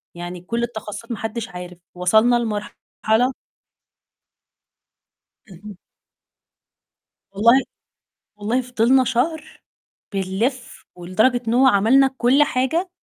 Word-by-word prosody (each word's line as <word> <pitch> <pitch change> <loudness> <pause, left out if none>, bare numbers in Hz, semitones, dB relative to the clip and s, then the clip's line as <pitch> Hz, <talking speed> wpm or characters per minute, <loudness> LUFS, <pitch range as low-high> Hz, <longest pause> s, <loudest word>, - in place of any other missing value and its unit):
يعني 175 +1 -7
كل 235 +6 -3
التخصصات 225 0 -7
ما 230 - -3
حدش 225 +2 -5
عارف، 180 -1 -9 0.2
وصلنا 220 +7 +3
لمرحلة 220 +2 -1 2.1
اهم. 195 +1 -12 1.6
والله 235 +6 +5 0.8
والله 220 +5 -1
فضلنا 250 +1 +2
شهر 305 +6 -2 0.5
بنلِف 215 +7 -3
ولدرجة 215 +8 +1
إن 225 - +1
هو 260 +2 +5
عملنا 255 +5 +4
كل 260 +5 +4
حاجة، 300 +7 -1
230 Hz, 90 wpm, -21 LUFS, 205-255 Hz, 2.1 s, والله